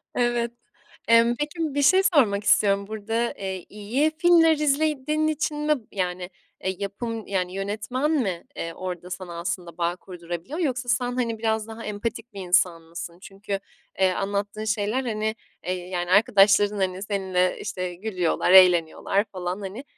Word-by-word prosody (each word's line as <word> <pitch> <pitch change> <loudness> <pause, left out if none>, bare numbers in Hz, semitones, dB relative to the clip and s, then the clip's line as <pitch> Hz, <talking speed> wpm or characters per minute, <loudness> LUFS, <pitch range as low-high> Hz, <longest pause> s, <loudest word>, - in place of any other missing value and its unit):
Evet. 240 -1 +1 0.6
Emm, 230 +1 +5
peki, 300 +3 -3 0.2
bir 285 - +2
şey 375 +7 +6
sormak 225 - +3
istiyorum, 200 -1 +3
burada, 225 +2 -2
eee, 190 -2 -5
iyi 235 +10 0
filmler 330 -2 +5
izlediğin 305 +1 +1
için 305 0 -1
mi, 300 0 +2 0.2
yani, 180 -1 -3 0.3
eee, 190 0 -1
yapım, 220 +2 -4
yani, 185 -2 -1
yönetmen 215 +9 -2
mi, 195 - 0
eee, 165 0 -4
orada 180 -1 -6
sana 180 -2 -6
aslında 170 0 -4
bağ 170 +1 0
kurdurabiliyor 175 - -7
yoksa 255 -6 -1
sen, 245 0 +1
hani, 230 -3 -1
biraz 220 -1 0
daha 225 +1 -8
empatik 220 +2 -4
bir 195 - -7
insan 175 -2 +2
mısın? 170 +1 -8
Çünkü, 195 0 -5 0.4
eee, 190 -1 +4
anlattığın 200 +3 -3
şeyler, 215 +4 0
hani, 220 -1 -1 0.3
eee, 185 - 0
yani, 180 0 -4
arkadaşların, 205 0 +5
hani, 190 -1 -1
seninle, 190 -3 0
işte, 180 -1 -4
gülüyorlar, 180 -3 0
eğleniyorlar 180 +1 +5
falan, 185 +1 -5
hani. 200 +7 -6
205 Hz, 150 wpm, -25 LUFS, 185-240 Hz, 0.6 s, şey